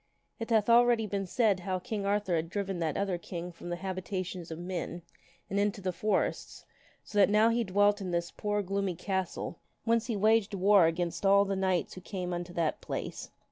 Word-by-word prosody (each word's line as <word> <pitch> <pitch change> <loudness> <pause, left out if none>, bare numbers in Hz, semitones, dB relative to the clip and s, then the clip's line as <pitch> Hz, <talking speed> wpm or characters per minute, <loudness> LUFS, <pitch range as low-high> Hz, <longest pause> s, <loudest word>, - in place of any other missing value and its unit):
(It 225 - -4
hath 220 -3 +3
already 235 -1 +5
been 200 -2 -3
said 210 -1 +2
how 185 +1 -2
King 200 +1 -4
Arthur 200 -3 +1
had 165 0 -1
driven 195 -1 -3
that 160 -3 -1
other 195 -3 -1
king 175 0 -6
from 175 +1 -9
the 175 - -1
habitations 185 -1 -4
of 160 - -5
men 175 -1 -5 0.4
and 200 - -1
into 205 0 0
the 185 -1 -2
forests, 195 +3 -1 0.4
so 210 - -2
that 200 - +6
now 215 +2 +5
he 235 +1 +1
dwelt 205 +1 +2
in 190 - -4
this 170 -1 -1
poor 205 0 -1
gloomy 195 -1 -1
castle 190 -1 -3 0.2
whence 230 0 +1
he 230 - -1
waged 215 0 +3
war 195 -2 +5
against 170 +2 -2
all 200 +1 +5
the 195 0 -1
knights 190 -2 0
who 185 - -9
came 180 -1 -4
unto 175 0 -4
that 165 -2 -1
place.) - - -5
195 Hz, 200 wpm, -30 LUFS, 175-205 Hz, 0.4 s, that